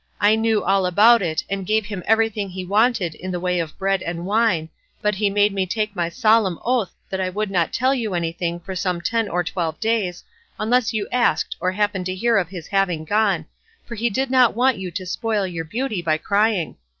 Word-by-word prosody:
I 205 Hz, +1 st, +5 dB
knew 220 Hz, -1 st, +1 dB
all 195 Hz, -1 st, +2 dB
about 220 Hz, +6 st, +6 dB
it, 160 Hz, -3 st, -1 dB
and 195 Hz, 0 st, -3 dB
gave 215 Hz, +3 st, +1 dB
him 205 Hz, -3 st, -5 dB
everything 220 Hz, -2 st, +1 dB
he 185 Hz, 0 st, -6 dB
wanted 205 Hz, -3 st, +2 dB
in 185 Hz, -, -8 dB
the 180 Hz, -1 st, -2 dB
way 180 Hz, 0 st, 0 dB
of 160 Hz, -3 st, -4 dB
bread 195 Hz, -1 st, 0 dB
and 170 Hz, +1 st, -4 dB
wine, 200 Hz, -6 st, +1 dB, 0.3 s
but 210 Hz, 0 st, +1 dB
he 205 Hz, +1 st, +1 dB
made 205 Hz, 0 st, +2 dB
me 190 Hz, -1 st, -1 dB
take 210 Hz, +1 st, -2 dB
my 170 Hz, -2 st, -1 dB
solemn 215 Hz, -3 st, +2 dB
oath 240 Hz, -6 st, +1 dB, 0.2 s
that 190 Hz, 0 st, -2 dB
I 185 Hz, -, 0 dB
would 205 Hz, +2 st, -3 dB
not 175 Hz, -4 st, +1 dB
tell 260 Hz, +2 st, +2 dB
you 225 Hz, -8 st, -2 dB
anything 170 Hz, 0 st, -2 dB
for 190 Hz, +2 st, -7 dB
some 180 Hz, -1 st, -1 dB
ten 225 Hz, +3 st, 0 dB
or 180 Hz, +1 st, 0 dB
twelve 165 Hz, -2 st, -3 dB
days, 220 Hz, -6 st, -1 dB, 0.4 s
unless 235 Hz, +2 st, +2 dB
you 215 Hz, -3 st, -2 dB
asked 250 Hz, -1 st, +1 dB
or 185 Hz, +1 st, 0 dB
happened 205 Hz, -2 st, -1 dB
to 185 Hz, -, -3 dB
hear 230 Hz, +3 st, +2 dB
of 175 Hz, -4 st, -3 dB
his 175 Hz, -4 st, -8 dB
having 180 Hz, -5 st, 0 dB
gone, 200 Hz, -4 st, +1 dB, 0.4 s
for -, -, -8 dB
he 235 Hz, +1 st, 0 dB
did 260 Hz, +5 st, -1 dB
not 255 Hz, -4 st, +4 dB
want 250 Hz, -1 st, +2 dB
you 185 Hz, -1 st, -4 dB
to 185 Hz, +2 st, -5 dB
spoil 215 Hz, +2 st, -1 dB
your 170 Hz, -3 st, -4 dB
beauty 220 Hz, +1 st, -3 dB
by 160 Hz, -2 st, +1 dB
crying. 200 Hz, -1 st, 0 dB
195 Hz, 220 wpm, -22 LUFS, 180-220 Hz, 0.4 s, about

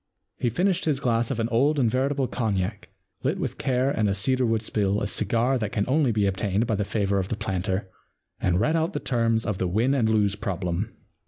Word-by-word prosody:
He 120 Hz, -, +1 dB
finished 185 Hz, -, 0 dB
his 150 Hz, -4 st, +1 dB
glass 115 Hz, -3 st, +1 dB
of 125 Hz, -, -2 dB
an 115 Hz, -, +1 dB
old 140 Hz, +6 st, +2 dB
and 130 Hz, -4 st, +3 dB
veritable 135 Hz, +3 st, +1 dB
cognac, 105 Hz, -4 st, -2 dB, 0.3 s
lit -, -, 0 dB
with -, -, -4 dB
care 130 Hz, +1 st, +1 dB
and 110 Hz, -6 st, +1 dB
a 100 Hz, -, 0 dB
cedar 125 Hz, +5 st, +1 dB
wood 115 Hz, -1 st, 0 dB
spill 105 Hz, -2 st, 0 dB
a -, -, -2 dB
cigar 115 Hz, +6 st, +1 dB
that 110 Hz, -2 st, -2 dB
can 105 Hz, -2 st, 0 dB
only 135 Hz, -1 st, +2 dB
be 105 Hz, -2 st, +1 dB
obtained 100 Hz, +2 st, 0 dB
by 115 Hz, -, -1 dB
the 105 Hz, 0 st, 0 dB
favour 100 Hz, -1 st, 0 dB
of 95 Hz, -, -2 dB
the 115 Hz, -, -2 dB
planter, 95 Hz, -1 st, -2 dB, 0.5 s
and 90 Hz, 0 st, +1 dB
read 155 Hz, +9 st, +2 dB
out 165 Hz, +3 st, 0 dB
the -, -, -2 dB
terms 115 Hz, -3 st, 0 dB
of 105 Hz, -4 st, -2 dB
the 95 Hz, -, 0 dB
Win 110 Hz, +9 st, +1 dB
and 120 Hz, -5 st, +2 dB
Lose 105 Hz, -2 st, +2 dB
Problem. 90 Hz, +1 st, -3 dB
110 Hz, 225 wpm, -25 LUFS, 100-130 Hz, 0.5 s, and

